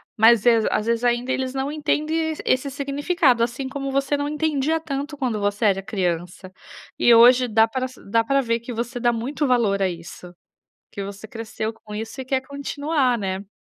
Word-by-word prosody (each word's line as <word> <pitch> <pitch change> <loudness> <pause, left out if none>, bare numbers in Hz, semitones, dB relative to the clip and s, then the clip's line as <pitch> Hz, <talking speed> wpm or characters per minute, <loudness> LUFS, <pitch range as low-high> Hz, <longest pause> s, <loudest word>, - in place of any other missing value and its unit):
mas 225 0 +5
as 230 -2 +4
às 215 - -1
vezes 235 +1 0
ainda 245 +1 +1
eles 260 -1 -1
não 270 +2 -2
entendem 310 +1 -1
esse 260 +2 +1
significado, 280 -1 +1
assim, 240 +3 -1
como 275 0 -4
você 275 +1 0
não 285 0 -2
entendia 305 0 0
tanto 290 -1 -5
quando 245 -6 -1
você 205 +2 -1
era 195 -1 +3
criança. 185 -2 -3 0.5
E 240 - +6
hoje 245 +2 +7
dá 220 0 +4
pra 255 +3 -2
sa 255 - -16
dá 225 +2 +2
para 275 +4 +1
ver 230 -1 0
que 235 +2 -8
você 240 +2 -4
dá 240 0 +2
muito 265 +6 -2
valor 220 -6 +2
a 190 - +2
isso. 175 +1 -9 0.6
Que 200 - -6
você 200 +2 -9
cresceu 220 -1 -5
com 215 -2 -12
isso 225 +5 -6
e - - -11
quer 260 0 0
continuar, 280 -2 -1
né? 195 0 -4
245 Hz, 195 wpm, -22 LUFS, 220-275 Hz, 0.6 s, hoje